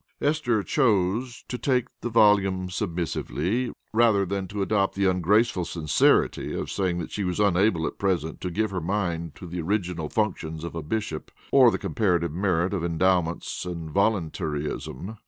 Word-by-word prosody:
Esther 145 -8 +1
chose 115 - +1
to 125 - -4
take 125 -3 +1
the 120 - -3
volume 100 -5 +3
submissively, 90 +4 -2 0.2
rather 110 -3 +4
than 95 0 -3
to 100 +1 -2
adopt 100 -1 +1
the 100 0 +1
ungraceful 95 +2 +2
sincerity 80 -3 +2
of - - -4
saying 90 -3 0
that 85 - -5
she 105 - -2
was 90 +1 -2
unable 95 -4 +3
at - - -5
present 90 -5 -1
to 90 - -2
give 105 +4 -1
her 95 -2 -2
mind 85 -3 -2
to - - -10
the 90 0 -4
original 90 -3 -2
functions 80 -7 -2
of 85 - -5
a 85 - -4
bishop 80 -1 -3 0.2
or 130 -3 +7
the - - -1
comparative 90 -6 0
merit 90 +1 0
of 90 -4 -2
Endowments 85 0 0
and 85 -3 -6
Voluntaryism. 85 - -2
95 Hz, 160 wpm, -26 LUFS, 85-105 Hz, 0.2 s, or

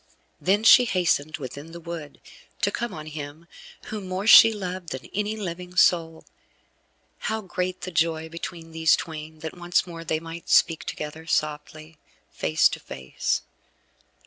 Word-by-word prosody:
Then 200 +3 +2
she 250 +2 +8
hastened 165 -7 +1
within 145 +4 -8
the 170 - -8
wood, 165 -3 -8 0.4
to - - +3
come 235 -1 -3
on 155 -4 -8
him 155 +1 -8 0.4
whom 210 -3 -5
more 185 +2 -3
she 225 0 +10
loved 185 -4 -5
than 130 0 -6
any 210 +2 -1
living 180 -2 -6
soul. 165 -3 +3 0.9
How 220 0 -2
great 185 -1 -3
the 185 - -5
joy 165 -1 0
between 165 0 -8
these 160 -1 +4
twain, 155 -1 -7
that 160 +1 -6
once 175 0 +1
more 165 -2 -8
they 155 -1 -1
might 165 +1 -9
speak 165 -2 +4
together 155 +2 -6
softly, 155 0 -3 0.3
face 80 0 +3
to - - -6
face. 65 -1 -3
165 Hz, 150 wpm, -25 LUFS, 155-185 Hz, 0.9 s, she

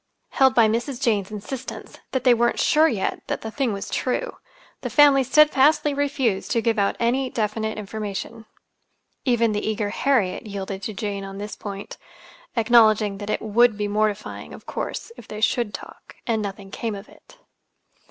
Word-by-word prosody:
Held 265 -1 +4
by 230 -2 +6
Mrs. 240 +4 -2
Jane's 210 -7 +1
insistence 235 +5 -7
that 260 -2 -2
they 250 - +6
weren't 240 0 +1
sure 310 +1 +4
yet 215 -10 -1
that - - -3
the 220 - -6
thing 265 -1 0
was 200 -1 -4
true, 380 - -2 0.4
the - - -3
family 285 -2 +6
steadfastly 295 +2 +4
refused 275 -8 0
to 230 - +1
give 230 -2 +1
out 200 - +1
any 255 +3 +1
definite 220 -1 -2
information. 215 +2 -5 0.8
Even 235 -3 +3
the 210 0 -2
eager 215 -1 -1
Harriet 230 -8 0
yielded 195 -1 -5
to 215 +2 -4
Jane 200 -1 -3
on 195 0 -7
this 205 +1 -6
point, 200 -1 -7 0.6
acknowledging 220 -3 +4
that 205 0 -6
it - - -1
would 220 +1 +3
be 210 -1 -1
mortifying, 210 0 -2
of - - -15
course, - - -5
if - - -12
they 210 - -7
should 230 0 +1
talk, - - -11
and 225 -2 0
nothing 195 -1 -6
came 225 0 -3
of 200 +1 -9
it. - - -19
220 Hz, 170 wpm, -23 LUFS, 205-255 Hz, 0.8 s, by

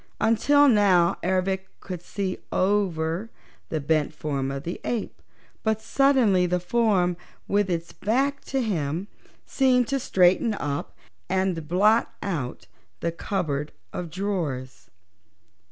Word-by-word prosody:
Until 285 +6 +4
now 195 -7 +4
Ervic 190 +1 0
could 180 -3 -7
see 190 +1 -3
over 185 -1 0 0.4
the 155 - -1
bent 155 +1 0
form 140 -3 -2
of 135 0 -4
the 170 +3 -5
ape, 235 -3 -3 0.4
but 220 -1 0
suddenly 235 -9 +3
the 180 +1 +1
form, 185 -3 +2 0.3
with 205 -1 +1
its 170 -1 -3
back 270 +7 0
to 265 -1 -1
him, 170 -3 -2 0.4
seemed 255 -3 +3
to 275 - +1
straighten 190 +1 +3
up 145 -5 -4 0.3
and 185 -4 0
blot 210 +7 +3
out 145 - -3 0.4
the 170 - 0
cupboard 160 -5 -3 0.2
of 175 -2 -4
drawers. 150 - -4
185 Hz, 120 wpm, -25 LUFS, 160-215 Hz, 0.4 s, Until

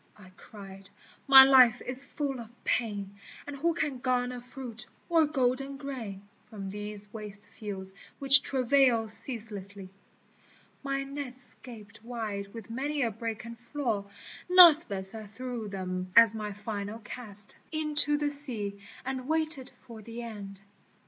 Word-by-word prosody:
I 185 -3 -16
cried, 195 0 -11 0.2
" - - -25
my 270 -1 +11
life 255 -3 +6
is 255 +2 -1
full 280 -2 -4
of 230 -2 -9
pain, 200 -4 -3 0.3
And 290 - -7
who 330 +4 -1
can 295 -6 -2
garner 250 0 -1
fruit 245 -2 -10 0.2
or 325 -2 +3
golden 275 -1 -1
grain, 230 -9 -8 0.2
From 195 -3 -7
these 210 0 -7
waste 210 -2 -9
fields 190 -3 -7 0.2
which 275 0 +7
travail 255 -3 +4
ceaselessly! 205 -4 -6 0.5
" - - -32
My 275 0 -1
nets 275 -2 -8
gaped 215 -4 -13
wide 215 -4 -6
with 225 -1 -10
many 280 +4 -2
a 230 - -1
break 225 +1 -6
and 230 0 -10
flaw 240 -5 -3 0.4
Nathless 305 - +7
I 220 -1 -8
threw 235 +1 -7
them 185 -1 -5
as 230 -2 +8
my 210 -1 -5
final 205 +1 -6
cast 210 -3 -11 0.2
Into 300 -2 +4
the 290 0 -1
sea, 225 -9 -4 0.3
and 260 -1 -5
waited 310 -4 -1
for 230 -3 -11
the 230 +2 -8
end. 200 -4 -9
230 Hz, 145 wpm, -28 LUFS, 205-270 Hz, 0.5 s, my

